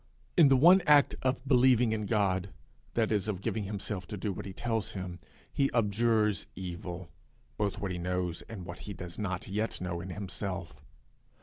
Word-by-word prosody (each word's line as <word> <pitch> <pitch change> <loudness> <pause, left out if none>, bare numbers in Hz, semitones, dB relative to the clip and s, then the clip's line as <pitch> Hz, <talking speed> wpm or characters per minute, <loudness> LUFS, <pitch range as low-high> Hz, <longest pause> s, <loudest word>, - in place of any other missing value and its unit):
In 165 -5 +8
the 135 -1 +5
one 175 +8 +7
act 145 -1 +6
of 130 0 -1
believing 125 -3 +5
in 105 -2 -1
God 100 -3 +1 0.5
that 115 -2 +2
is, 105 -2 +1
of 100 -4 -2
giving 105 +1 -2
himself 100 -2 -4
to 105 - -5
do 100 +1 -2
what 95 - -6
he - - -6
tells 110 +1 -2
him 90 -2 -5 0.3
he 140 -1 +2
abjures 105 -1 +2
evil, 90 -2 -6 0.4
both 105 0 -1
what 100 -3 -3
he 90 - -3
knows 90 -1 -2
and 100 -6 -7
what 85 +1 -8
he 105 - -7
does 90 0 -8
not 95 -3 -3
yet 105 +3 -2
know 90 -1 -3
in 95 - -7
himself. 95 -2 -5
100 Hz, 185 wpm, -30 LUFS, 90-115 Hz, 0.5 s, In